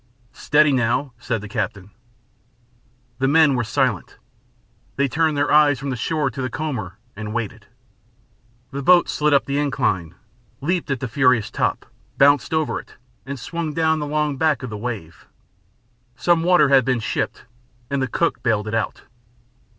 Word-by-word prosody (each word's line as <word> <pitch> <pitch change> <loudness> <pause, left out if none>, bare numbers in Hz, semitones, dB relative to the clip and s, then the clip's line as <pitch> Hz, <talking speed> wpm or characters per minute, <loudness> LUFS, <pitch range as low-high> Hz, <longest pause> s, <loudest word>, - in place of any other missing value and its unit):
"Steady 150 0 +3
now," 125 +1 0
said 115 -3 -3
the 105 - -8
captain. 100 0 -4 1.3
The 135 - +2
men 155 0 +5
were 125 -2 0
silent. 125 -4 -1 0.8
They 140 +1 +1
turned 155 +2 0
their 145 0 +1
eyes 150 -2 +5
from 140 +2 -4
the - - -2
shore 145 +3 -1
to 135 - -6
the 130 - -2
comber 120 - -4 0.2
and 105 +1 -6
waited. 115 -4 -4 1.0
The 140 - -4
boat 175 +4 +5
slid 150 0 0
up 140 -1 +3
the 140 +1 -1
incline, 95 - -1 0.4
leaped 170 +3 -1
at 135 -3 -2
the 130 - -2
furious 125 -2 +2
top, - - -1 0.3
bounced 140 0 +4
over 160 -1 0
it, - - -15 0.3
and 140 -1 -5
swung 165 +3 -4
down 160 -1 +2
the 150 - -3
long 150 -1 -1
back 155 -3 +1
of 125 - -5
the - - -5
wave. 105 -8 -6 0.9
Some 165 +7 +2
water 170 -4 +4
had 135 -1 +5
been 125 0 0
shipped 110 - -3 0.5
and 140 -1 0
the 130 - 0
cook 170 +6 -1
bailed 110 -3 0
it 105 - -4
out. 115 -1 -2
135 Hz, 165 wpm, -21 LUFS, 120-150 Hz, 1.3 s, men